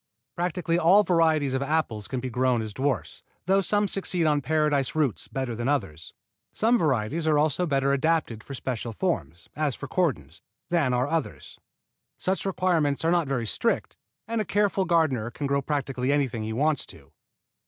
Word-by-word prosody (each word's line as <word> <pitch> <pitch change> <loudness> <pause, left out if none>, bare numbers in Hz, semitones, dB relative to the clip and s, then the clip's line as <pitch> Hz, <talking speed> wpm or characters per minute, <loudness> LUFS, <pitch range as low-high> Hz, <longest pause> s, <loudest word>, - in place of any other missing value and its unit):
Practically 175 -1 -1
all 185 +5 +6
varieties 160 -6 +2
of 130 - 0
apples 140 -8 -1
can 130 - -3
be 130 0 -5
grown 125 -1 +1
as 110 -1 -6
dwarfs, 130 -1 -2 0.2
though 195 +2 +3
some 205 +2 +2
succeed 185 -3 0
on 150 -2 +2
Paradise 150 -1 +1
roots 140 - 0
better 130 -3 -3
than 120 +2 -3
others. 95 - -2 0.4
Some 230 +3 +2
varieties 155 - 0
also 155 +2 +2
are - - -5
better 140 -2 +1
adapted 140 -6 0
for 140 - -7
special 120 -3 -4
forms, 90 - -3
as 150 -4 -1
for 145 - -7
cordons, 85 - -1 0.3
than 165 -7 +2
are 125 +1 +1
others. 165 +1 -4 0.6
Such 190 +1 -1
requirements 165 -6 +1
are 165 - +3
not 170 -4 +2
very 130 -4 -1
strict, 100 - -1 0.3
and 230 0 -1
a - - 0
careful 205 -1 +1
gardener 155 -10 +1
can 140 +5 -5
grow 140 0 +1
practically 135 -2 -1
anything 135 -6 0
he 110 +1 -4
wants 145 +5 +1
to. - - -13
145 Hz, 175 wpm, -26 LUFS, 125-165 Hz, 0.6 s, all